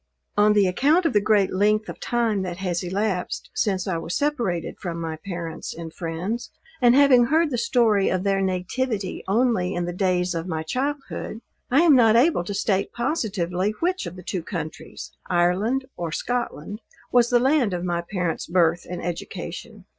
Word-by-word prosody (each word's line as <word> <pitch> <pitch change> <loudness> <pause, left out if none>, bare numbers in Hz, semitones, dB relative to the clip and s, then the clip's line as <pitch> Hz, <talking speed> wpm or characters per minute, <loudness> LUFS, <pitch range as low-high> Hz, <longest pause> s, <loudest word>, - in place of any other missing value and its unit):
On 210 +1 +5
the 205 -2 +4
account 290 - +3
of 325 - +2
the 210 - +4
great 205 -2 +2
length 210 +3 +2
of - - -8
time 230 -4 0
that 180 -2 -4
has 180 -3 -2
elapsed 190 0 -2
since 190 -3 0
I 180 -3 0
was 165 +1 -4
separated 245 - -1
from 170 -2 -4
my 165 -1 -3
parents 170 -1 -6
and 165 -1 -7
friends, 180 +7 -4 0.3
and 245 0 +6
having 270 -4 +6
heard 315 +4 +2
the 245 - -1
story 220 -6 +3
of 185 0 -1
their 195 -1 +1
nativity 190 +3 -2
only 195 -3 +1
in 175 0 -1
the 175 - -4
days 180 -1 +1
of 165 +1 -4
my 160 -3 -2
childhood, 270 - -3 0.3
I 270 +5 +4
am 330 -5 +6
not 225 -3 +5
able 255 - +4
to 205 - -4
state 195 -1 0
positively, 210 - -1
which 365 +2 -1
of 175 - -7
the 185 - -10
two 180 +1 -3
countries, 160 -3 -7 0.2
Ireland 190 +9 +1
or 170 -2 -3
Scotland, 215 -1 -3 0.3
was 240 -1 +4
the 245 - +4
land 260 -3 +2
of 175 -1 -3
my 175 -1 -1
parents 180 -1 -3
birth 170 -1 +2
and 180 -1 -5
education. 180 +4 -6
195 Hz, 180 wpm, -24 LUFS, 175-240 Hz, 0.3 s, and